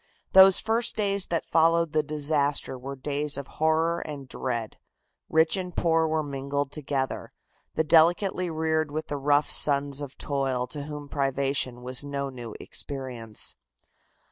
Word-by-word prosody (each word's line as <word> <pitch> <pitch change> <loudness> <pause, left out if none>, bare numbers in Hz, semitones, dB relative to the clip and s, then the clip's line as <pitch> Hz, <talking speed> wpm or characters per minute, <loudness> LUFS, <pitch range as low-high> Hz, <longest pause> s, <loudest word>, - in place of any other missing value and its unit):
Those 190 0 +8
first 230 +2 0
days 200 -2 +2
that 165 -1 -1
followed 165 0 +2
the 155 - +3
disaster 145 -2 -1
were 135 +2 -7
days 145 +2 0
of 140 - -5
horror 160 +3 +1
and 145 -5 -7
dread. 120 -4 -4 0.5
Rich 160 +3 +3
and 180 -2 -6
poor 165 -1 +2
were 155 0 0
mingled 140 0 -3
together, 140 -3 -3 0.4
the 160 - +2
delicately 175 +3 +3
reared 160 -1 0
with 155 +2 -5
the 145 - -2
rough 145 +1 +2
sons 140 -1 +3
of 140 -2 -7
toil 135 -3 -1
to 145 0 -6
whom 150 -1 -7
privation 135 -3 -1
was 130 +2 -2
no 140 -1 -4
new 120 -4 -8
experience. 125 -6 -4
145 Hz, 145 wpm, -26 LUFS, 135-160 Hz, 0.5 s, Those